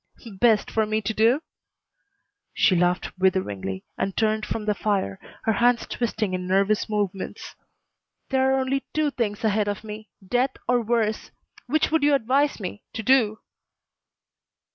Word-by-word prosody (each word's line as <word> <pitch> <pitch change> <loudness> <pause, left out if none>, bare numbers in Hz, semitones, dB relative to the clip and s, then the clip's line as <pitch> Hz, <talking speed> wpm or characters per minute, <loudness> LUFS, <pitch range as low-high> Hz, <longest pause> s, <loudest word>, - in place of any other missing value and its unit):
"Best 225 -2 +3
for 220 -1 +1
me 215 0 0
to 220 - -1
do?" 235 +8 +3 1.1
She 190 - +4
laughed 180 +1 +1
witheringly 100 - 0 0.2
and 195 - -2
turned 215 -1 +1
from 215 - -3
the 210 - +2
fire, 200 - -1 0.2
her 225 - +2
hands 240 +2 +3
twisting 220 -4 -2
in 180 0 -3
nervous 200 +3 +2
movements. 205 -3 -3 0.8
"There 265 0 +2
are 265 - +2
only 270 +1 -1
two 305 -1 +2
things 215 -5 -2
ahead 215 -1 +2
of 205 +1 -3
me. 215 0 -8 0.2
Death 250 +4 +1
or 245 -1 +3
worse. 225 -1 0 0.4
Which 305 +5 +1
would 320 -1 +3
you 290 0 +4
advise 275 +3 +1
me 200 +1 -6
to 225 - -4
do?" 225 -4 +3
220 Hz, 150 wpm, -24 LUFS, 200-245 Hz, 1.1 s, She